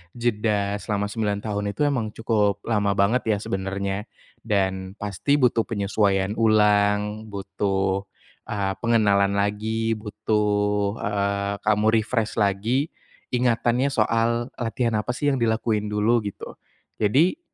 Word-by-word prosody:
jeda 105 -4 0
selama 105 0 -2
9 105 -2 -1
tahun 105 -1 -2
itu 150 - 0
emang 120 -7 -1
cukup 105 -3 0
lama 105 -3 +1
banget 105 +6 +2
ya, 110 -2 +2
sebenarnya. 95 +1 -3 0.4
Dan 95 -3 -1
pasti 105 +7 0
butuh 120 -3 +3
penyesuaian 100 -2 0
ulang, 105 -1 +2
butuh, 95 -1 -1 0.4
eee, 100 -2 -2
pengenalan 100 -4 +3
lagi, 110 +2 0
butuh, 105 -1 0
eee, 100 0 -1
kamu 105 0 +2 0.2
refresh 110 0 -2
lagi 110 +8 +1 0.4
ingatannya 120 +1 +2
soal, 115 -1 +1
"Latihan 120 0 -1
apa 125 +3 -3
sih 145 +2 +1
yang 135 - -1
dilakuin 110 -2 0
dulu." 105 +3 +2
gitu. 100 - -9 0.4
Jadi, 140 - +3
105 Hz, 120 wpm, -24 LUFS, 100-115 Hz, 0.4 s, butuh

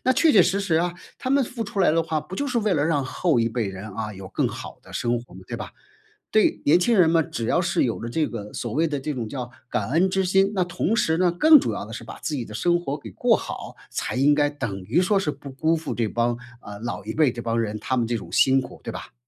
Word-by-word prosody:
那 260 - +3
确 320 +2 +4
确 195 - +7
实 195 +3 +1
实 185 -5 +1
啊， 175 +1 0 0.2
他 255 - -4
们 275 0 +3
付 235 -1 -5
出 200 -1 -6
来 180 - +5
的 165 - +2
话， 160 -1 -1
不 165 +5 -9
就 285 - -2
是 250 -3 0
为 210 -2 +1
了 145 - +2
让 145 -4 +1
后 155 +2 +1
一 115 0 +2
辈 115 -2 -2
人， 95 +2 -7
啊， 110 -1 -4
有 95 0 -9
更 - - 0
好 - - -8
的 - - -15
生 120 0 0
活 120 - -16
吗？ - - -10
对 - - -6
吧？ - - -7 0.6
对， 215 - +3
年 165 +5 +5
轻 230 +2 +3
人 170 - +6
嘛， 165 0 +4
只 115 -5 -4
要 - - +2
是 - - +1
有 - - -1
了 115 - -4
这 155 +3 +1
个， 105 -3 -7
所 120 -3 -4
谓 165 +4 +2
的 145 -2 -2
这 150 +2 -3
种 115 -4 -4
叫 125 -2 -5 0.2
感 105 +2 -1
恩 180 +4 +3
之 190 0 +1
心， 195 +2 +3
那 190 -3 +1
同 180 +5 -1
时 160 -7 +2
呢， 180 0 +3
更 305 - +7
主 - - -2
要 - - -4
的 - - -10
是 - - -6
把 - - -9
自 155 - -3
己 125 - -2
的 110 - -11
生 175 +10 +1
活 145 -3 -3
给 115 - -10
过 - - +3
好， - - -7
才 - - -3
应 145 +3 +4
该 145 0 +2
等 120 -10 -4
于 95 - +1
说 195 +3 +2
是 150 - 0
不 140 0 -10
辜 155 +5 +1
负 160 - -4
这 115 -2 0
帮， 120 +2 0 0.2
呃， 105 0 -9
老 115 -4 -4
一 110 - -5
辈 150 -4 +4
这 120 - -6
帮 115 0 0
人， 110 -1 -2
他 130 - -2
们 120 - +2
这 115 +1 -1
种 - - -8
辛 135 0 +4
苦， 125 - -10
对 - - -5
吧？ - - -9
150 Hz, 310 characters per minute, -24 LUFS, 120-180 Hz, 0.6 s, 确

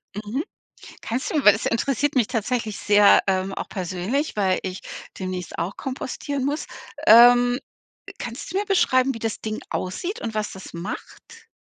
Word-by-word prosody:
Mhm. 215 +8 -3 0.6
Kannst 240 +3 -3
du 300 -3 0
weil 210 - +9
das 220 - -4
interessiert 275 +4 0
mich 240 -5 +3
tatsächlich 225 -2 -2
sehr, 205 0 +5
ähm, 190 0 0
auch - - -5
persönlich, 190 - -2
weil 190 -3 +1
ich 185 0 -5 0.4
demnächst 185 -2 -5
auch 175 +4 -3
kompostieren 270 +1 -4
muss. 290 +2 -2 0.4
Ähm, 245 +2 +7 0.6
kannst 240 +7 -6
du 385 - 0
mir 410 - 0
beschreiben, 265 -9 +3
wie - - -6
das 225 -1 -3
Ding 215 0 -4
aussieht 345 - -3
und 225 -2 -4
was 215 -1 -2
das 190 - -10
macht? 245 - -8
230 Hz, 160 wpm, -23 LUFS, 195-265 Hz, 0.6 s, weil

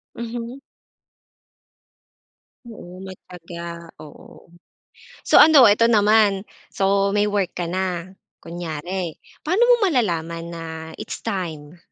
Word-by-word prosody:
Mhm. 235 +2 -6 2.1
Oo, 185 -5 -11
matiyaga, 170 -2 -10
oo. 150 -2 -14 0.7
So - - +3
ano, 290 -7 +8
eto 210 +3 +4
naman. 210 -3 +3 0.3
So, 195 0 +1
may 210 0 +2
work 200 -3 -1
ka 175 -2 -4
na 180 -1 -3 0.3
kunyari, 170 +1 -6 0.2
paano 365 +8 +1
mo - - +8
malalaman 170 - -1
na 170 -1 -7 0.3
it's - - -7
time 170 -7 -5
190 Hz, 100 wpm, -21 LUFS, 170-215 Hz, 2.1 s, ano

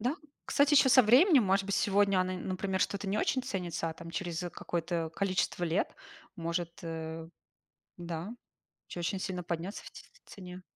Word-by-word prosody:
Да, 250 +6 0 0.3
кстати, 285 +1 +3
ещё 275 - +6
со 255 0 +8
временем, 260 - +6
может 195 +1 +2
быть, 200 - 0
сегодня 200 -1 +3
она, 185 0 -1
н 185 - -6
например, 190 0 -2
что-то 200 +2 -1
не 205 - 0
очень 260 - +1
ценится, 180 -9 -3
а - - -5
там 165 0 -10
через 170 -2 -3
какое-то 170 -2 -3
количество 185 -2 0
лет 170 +3 0 0.4
может, 170 0 -2
э, 160 -1 -5 0.7
да, 170 +1 -5 0.6
очень-очень 175 +2 -3
сильно 180 -1 -3
подняться 170 +3 -4
в - - -10
ц - - -12 0.2
в - - -19
цене. 180 -1 -9
185 Hz, 175 wpm, -31 LUFS, 170-200 Hz, 0.7 s, со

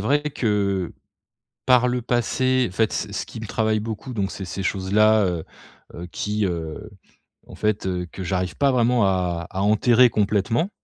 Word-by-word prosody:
vrai 140 +8 +1
que, 100 - -1 0.7
par 125 -1 +5
le 125 0 -1
passé 125 +1 +1
fait 110 +3 +1
ce 105 - -3
ce 100 - -3
qui 115 - -9
me 110 - -6
travaille 110 0 0
beaucoup 110 +4 -6
donc 100 -4 -2
c'est 95 - -6
ces 95 +2 -5
choses-là. 105 +3 +3
Heu, 85 -3 -2 0.5
heu, 85 - -7
qui, 105 +2 -1
heu, 85 +3 -4 0.6
en - - -11
fait, 105 -2 -1
heu, 90 -1 -2
que 95 - -7
j'arrive 90 0 -2
pas 140 -1 +3
vraiment 120 -3 +3
à 90 -3 -1
à 95 - -3
enterrer 115 +4 +5
complètement. 110 - 0
105 Hz, 170 wpm, -23 LUFS, 95-120 Hz, 0.7 s, par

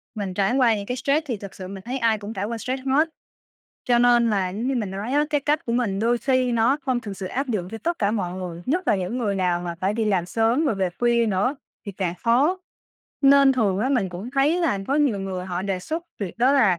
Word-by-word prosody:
mình 200 -3 -3
trải 195 +5 +1
qua 245 -4 +4
những 200 -1 -5
cái 250 +3 -3
stress 285 +5 +1
thì 245 -7 -3
thật 200 -1 -10
sự 185 -1 -7
mình 195 0 -8
thấy 250 +5 -3
ai 230 -3 +2
cũng 205 +2 -7
trải 200 -1 -3
qua 230 +1 -4
stress 255 +4 -4
hết. 295 +5 +3 0.8
Cho 240 -1 +3
nên 240 -1 +4
là 195 -3 +1
giống 215 +6 -4
như 270 - 0
mình 215 -6 -2
nói 200 +6 -4
á, 295 +1 +3
cái 295 -1 +2
cách 300 +3 0
của 235 - -1
mình 230 -5 0
đôi 235 +2 +2
khi 255 -1 +1
nó 235 +4 +3
không 255 -2 0
thực 205 -4 -7
sự 190 - -5
áp 270 +8 -3
dụng 195 -7 -2
cho 225 - -6
tất 340 +5 -2
cả 200 -1 +1
mọi 185 -5 -2
người, 180 -2 -6
nhất 350 +7 0
là - - +4
những 190 +6 -3
người 210 -5 0
nào 180 -2 0
mà 175 -1 -4
phải 195 +2 0
đi 225 0 0
làm 190 -5 +1
sớm 230 - +1
rồi 250 - +1
về 190 -2 0
khuya 235 -1 +3
nữa 215 +7 0 0.3
thì 200 - -5
càng 180 -2 -2
khó. 275 +11 +3 0.6
Nên 275 0 +6
thường 210 -7 +1
á 250 +6 0
mình 245 -9 +1
cũng 185 +7 -7
thấy 280 +5 +2
là 320 - +1
có 275 - +1
nhiều 280 -9 +2
người 185 -1 -4
họ 180 -1 -3
đề 195 -1 -2
xuất 320 - -4
việc 200 +2 -5
đó 255 +3 +4
là 215 -11 +4
230 Hz, 270 wpm, -23 LUFS, 195-260 Hz, 0.8 s, Nên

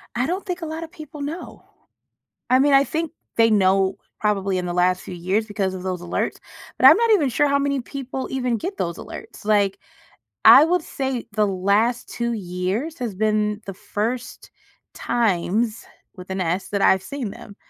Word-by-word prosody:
I 245 +1 +1
don't 365 +6 -3
think 360 -1 -4
a - - -3
lotta 320 +1 -5
people 310 -3 -11
know. 305 +5 -6 0.9
I 255 - +6
mean, 280 +2 +3
I 275 - +7
think 320 +2 -3 0.2
they 225 0 +5
know 195 -2 +3 0.2
probably 195 -3 0
in 180 - -3
the 175 - -3
last 180 +1 +2
few - - -8
years 185 +5 -1
because 200 -3 -2
of 185 - -6
those 185 -2 -3
alerts, 175 - -2 0.4
but - - +6
I'm - - +10
not 465 +1 +2
even 315 -10 +3
sure 260 +4 +2
how 280 0 +2
many 280 -1 0
people 265 +1 -5
even 250 -3 0
get 370 - -5
those 170 -1 -3
alerts, - - -10
like, 205 -2 +2 0.7
I 275 - +10
would 355 +1 +1
say 265 -5 -3
the 210 0 +2
last 200 +6 +1
2 235 0 -3
years 195 - -3
has 240 -6 -3
been 210 +1 0
the 195 - -6
first 225 +6 -4 0.4
times 220 0 0 0.3
with 180 -1 -10
an 190 0 -2
S, 180 +3 -2
that 200 -1 -1
I've 190 -1 +4
seen 240 +2 -5
them. 200 +1 -12
220 Hz, 185 wpm, -22 LUFS, 190-275 Hz, 0.9 s, I'm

